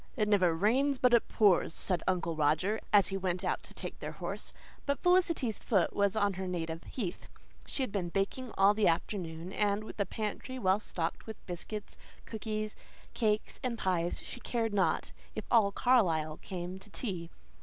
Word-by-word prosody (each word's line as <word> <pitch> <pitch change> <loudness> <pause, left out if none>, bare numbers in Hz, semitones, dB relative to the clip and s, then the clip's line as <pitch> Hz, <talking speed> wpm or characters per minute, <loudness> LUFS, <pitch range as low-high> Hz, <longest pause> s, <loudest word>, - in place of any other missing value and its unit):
"It 210 -2 +2
never 185 -5 +4
rains 260 - +2
but 250 -1 +4
it 235 - +5
pours," 195 -6 +3
said 180 -4 0
Uncle 180 -3 +1
Roger, 155 +8 +2
as 205 -2 +6
he 195 - -1
went 185 -2 -1
out - - 0
to - - -9
take - - -6
their - - -5
horse. - - -5 0.4
But 280 0 0
Felicity's 340 - +3
foot 190 -7 +2
was 200 0 +2
on 205 -2 +2
her 190 +1 -4
native 165 -2 -3
heath. 195 -9 -5 0.4
She 270 - -1
had 255 - -3
been 185 -4 -1
baking 200 +7 -1
all 195 +1 +6
the 210 -1 +3
afternoon, 170 0 -1
and, 205 0 +1
with 215 - -10
a 200 - +1
pantry 220 +6 -4
well 190 -4 +3
stocked 170 -3 -4
with 220 - -9
biscuits, 200 +4 -5 0.3
cookies, 215 -1 -4 0.4
cakes, 215 -2 0
and 245 -2 -1
pies, 175 -4 0
she - - -6
cared 230 -3 -1
not 195 -2 +1 0.2
if - - -4
all 220 -4 +5
Carlisle 165 -11 +2
came 180 0 -6
to 210 - -14
tea. 185 -7 -3
200 Hz, 180 wpm, -32 LUFS, 180-220 Hz, 0.4 s, as